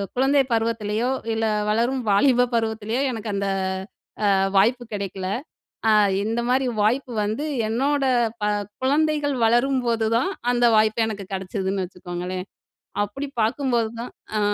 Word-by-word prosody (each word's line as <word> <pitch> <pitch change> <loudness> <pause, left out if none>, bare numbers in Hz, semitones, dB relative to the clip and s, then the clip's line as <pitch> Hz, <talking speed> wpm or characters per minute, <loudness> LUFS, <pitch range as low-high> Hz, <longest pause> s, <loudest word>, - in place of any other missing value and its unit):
குழந்தை 270 +2 +4
பருவத்திலயோ, 225 +1 0 0.2
இல்ல 225 0 0 0.2
வளரும் 240 +4 +1
வாலிப 245 +4 +4
பருவத்திலேயோ 220 +2 -1
எனக்கு 220 -2 -5
அந்த 200 0 -1 0.9
அ - - +4 0.2
வாய்ப்பு 240 +5 +3
கிடைக்கல. 195 -2 -4 0.6
அ - - +6 0.3
இந்த 225 +2 -1
மாரி 260 +1 +2 0.2
வாய்ப்பு 245 +4 +1
வந்து 220 +9 -2 0.2
என்னோட 275 +5 +1 0.4
ப - - +1 0.4
குழந்தைகள் 295 0 +2
வளரும்போதுதான், 240 - +2 0.2
அந்த 240 0 +3
வாய்ப்பு 220 +1 +3
எனக்கு 205 -3 -5
கிடைச்சதுன்னு 190 0 -2
வச்சுக்கோங்களேன். 180 +1 -6 0.6
அப்படி 275 +8 -5 0.2
பார்க்கும்போது 235 -1 +1
தான் 245 - -6 0.3
அ - - +1
230 Hz, 120 wpm, -23 LUFS, 210-260 Hz, 0.9 s, அ